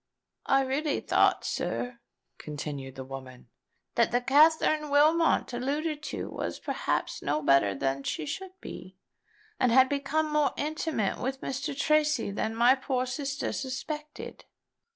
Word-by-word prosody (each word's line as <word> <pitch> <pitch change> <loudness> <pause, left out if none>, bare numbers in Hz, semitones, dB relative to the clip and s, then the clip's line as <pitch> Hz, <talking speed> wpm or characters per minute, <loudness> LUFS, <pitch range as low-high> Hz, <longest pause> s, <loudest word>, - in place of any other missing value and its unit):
"I 270 0 +4
really 280 +3 -1
thought, - - +2
sir," 245 -1 -3 0.4
continued 145 -3 -6
the 130 - -6
woman, 130 -2 -10 0.4
"that 235 -2 +3
the 245 - +3
Katherine 300 +3 +4
Wilmot 310 0 +3
alluded 295 +5 -2
to - - -5
was - - -4
perhaps - - -2
no 150 +2 -1
better 135 -9 +4
than 135 +4 -1
she 150 +2 -3
should 375 - -6
be, 185 0 -9 0.6
and 250 - +3
had 260 +2 +6
become 300 +2 0
more 300 -2 +2
intimate 305 -7 -1
with 265 +1 -3
Mr. 275 +2 -3
Tracy 305 -5 +2
than 220 +2 -2
my 240 +3 +6
poor 260 -1 -1
sister 275 +2 -3
suspected. 295 +3 -6
270 Hz, 135 wpm, -28 LUFS, 200-300 Hz, 0.6 s, had